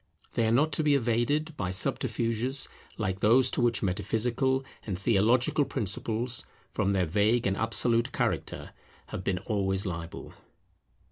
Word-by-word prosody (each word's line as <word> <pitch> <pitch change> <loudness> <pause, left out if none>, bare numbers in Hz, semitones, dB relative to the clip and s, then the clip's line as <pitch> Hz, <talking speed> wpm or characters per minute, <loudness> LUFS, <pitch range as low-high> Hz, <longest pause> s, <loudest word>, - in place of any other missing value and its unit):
They 115 - +1
are - - +2
not 150 +7 +3
to 155 - 0
be 145 -1 +4
evaded 140 +6 0
by 90 -9 -3
subterfuges 115 +7 +1 0.3
like 95 0 -2
those 125 +5 +5
to - - 0
which 120 -3 +1
metaphysical 120 +7 0 0.2
and 95 -5 -4
theological 115 +8 +3
principles, 115 +2 -2 0.3
from 100 - 0
their 95 -2 +2
vague 105 +8 +2
and 95 - +1
absolute 115 +3 +1
character, - - -2 0.4
have 95 - -5
been 95 -1 0
always 95 -2 0
liable. 85 -2 -6
115 Hz, 140 wpm, -28 LUFS, 95-125 Hz, 0.4 s, those